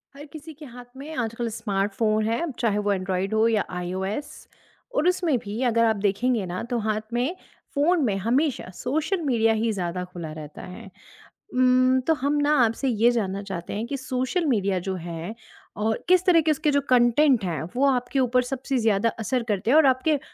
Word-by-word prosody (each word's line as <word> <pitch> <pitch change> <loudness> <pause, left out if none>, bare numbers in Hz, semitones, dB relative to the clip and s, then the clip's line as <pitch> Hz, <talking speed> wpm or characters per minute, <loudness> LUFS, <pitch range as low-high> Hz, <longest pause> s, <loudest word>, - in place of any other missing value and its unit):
हर 290 +2 -10
किसी 310 0 -9
के 300 +1 -12
हाथ 245 -1 -11
में 295 +3 -8
आजकल 230 0 -2
स्मार्टफ़ोन 215 0 -1
है 230 +5 0
अब 335 -5 -3
चाहे 225 -4 +1
वो 205 - +2
एंड्रॉइड 190 +1 -2
हो 220 +1 +3
या 220 -3 +2
आईओएस। 185 +8 -5 0.5
और 340 - +2
उसमें 355 -6 +2
भी 210 +3 -6
अगर 230 0 +3
आप 220 -1 +2
देखेंगे 215 +2 +1
ना 180 0 -4
तो 245 - 0
हाथ 215 0 -1
में, 250 +9 0 0.4
फ़ोन 315 +3 +3
में 205 -4 0
हमेशा 250 +5 0
सोशल 315 +8 -1
मीडिया 230 -6 +2
ही 220 +1 0
ज़्यादा 180 -3 -3
खुला 175 -3 -8
रहता 155 -1 -9
है। 195 +3 -10 0.6
उम्म, 255 0 +4
तो 320 +6 +2
हम 285 +2 +1
ना 295 +1 +3
आपसे 230 +5 -2
ये 235 -1 +3
जानना 200 -4 -2
चाहते 185 -4 -6
हैं 215 +3 -3
कि 280 - -3
सोशल 260 +6 -2
मीडिया 200 -8 +1
जो 190 - -1
है 170 +4 -5 0.4
और 220 +1 -1
किस 365 0 +4
तरह 345 -3 +5
के 315 0 +2
उसके 305 0 +1
जो 285 0 +2
कंटेंट 250 0 +4
हैं, 165 -5 -2
वो 270 +3 +2
आपके 250 +1 -1
ऊपर 250 -1 +3
सबसे 265 +1 -3
ज़्यादा 225 -1 +2
असर 245 +3 -1
करते 210 +3 0
हैं 300 - +6
और 315 - +6
आपके 270 +3 +2
235 Hz, 200 wpm, -24 LUFS, 205-275 Hz, 0.6 s, हैं